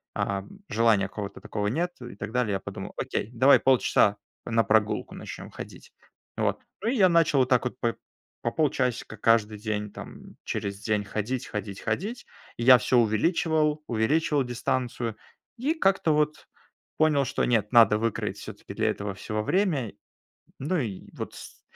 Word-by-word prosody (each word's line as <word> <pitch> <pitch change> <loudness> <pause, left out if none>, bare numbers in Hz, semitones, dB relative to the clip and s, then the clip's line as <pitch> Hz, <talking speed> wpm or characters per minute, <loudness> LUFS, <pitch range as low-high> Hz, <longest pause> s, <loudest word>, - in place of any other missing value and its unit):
а 100 -1 -1 0.3
желания 110 -3 +3
какого-то 100 0 -7
такого 105 -1 -3
нет 170 +11 0
и 120 -4 -8
так 100 +1 -6
далее. 120 -4 0
Я 95 - 0
подумал: - - -7
окей, - - -2
давай 130 +4 +6
полчаса 120 -5 +3 0.3
на 115 -1 +2
прогулку 110 -1 +1
начнем - - -8
ходить. - - -10 0.5
Вот, - - 0 0.2
ну, 215 - -2
и 255 - 0
я 190 -6 +5
начал 165 -4 +4
вот 130 -1 +2
так 125 -1 +3
вот 125 - -3
по 115 -1 0 0.5
по 115 - 0
полчасика 130 -7 0
каждый 110 0 +2
день 105 0 -3
там, - - -11
через 100 0 -4
день 105 -2 0
ходить, 110 +5 -3
ходить, 105 -2 -5
ходить. 205 - -3 0.3
И 120 - -3
я 125 +1 +9
всё 125 +1 +1
увеличивал, 150 - +2
увеличивал 140 +6 +1
дистанцию 125 -2 -2 0.4
и 275 +7 0
как-то 195 - +2
вот 150 0 0 0.5
понял, 155 -3 +3
что 130 - 0
нет, 110 -4 +1
надо 115 -4 +6
выкроить 115 0 -2
всё-таки - - -9
для - - +1
этого 100 -1 -3
всего 105 +2 -3
время. 155 - 0 0.7
Ну 160 +7 -1
и 110 -9 -4
вот - - -6
с - - -12
120 Hz, 165 wpm, -27 LUFS, 105-150 Hz, 0.7 s, я